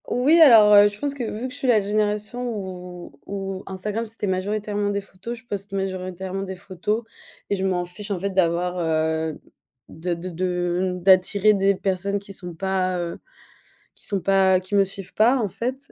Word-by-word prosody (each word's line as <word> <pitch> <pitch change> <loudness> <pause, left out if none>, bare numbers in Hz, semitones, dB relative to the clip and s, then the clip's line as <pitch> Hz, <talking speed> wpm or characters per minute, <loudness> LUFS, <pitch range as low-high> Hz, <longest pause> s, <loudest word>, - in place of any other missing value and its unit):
Oui 285 +7 +3
alors, 225 -8 +8
heu, 205 0 +8
je 205 0 -5
pense 285 -1 -2
que 275 -3 -5
vu 225 +2 -4
que 255 - -9
je - - -7
suis 265 - -2
la 235 -3 +5
génération 210 +3 -1
où 180 -5 -7 0.2
où 195 -1 -5
Instagram 210 +4 -3
c'était 220 -1 -5
majoritairement 205 +2 -1
des 200 0 0
photos, 195 +5 -8
je 230 - -15
poste 200 -2 -6
majoritairement 190 0 -3
des 190 -1 -5
photos 200 +4 -3 0.5
et - - +3
je 190 - -3
m'en 180 -2 0
fiche 200 +4 -9
en 200 - -1
fait 200 +3 -2
d'avoir, 180 -1 +1
heu, 160 -1 0 0.5
de 170 +2 -3
de 175 +2 -6
de 180 +1 -1
d'attirer 190 +3 +4
des 195 0 +2
personnes 195 +1 -1
qui 200 0 -9
sont 175 -3 -8
pas, 185 0 -1
heu 170 -1 -4 0.8
qui - - -16
sont 200 -2 -1
pas, 190 0 +4
heu, - - 0
qui 185 +2 -4
me 200 - +6
suivent 195 -1 -8
pas, 235 +5 +4
en 220 -5 -1
fait. 255 +8 -5
195 Hz, 195 wpm, -23 LUFS, 185-210 Hz, 0.8 s, alors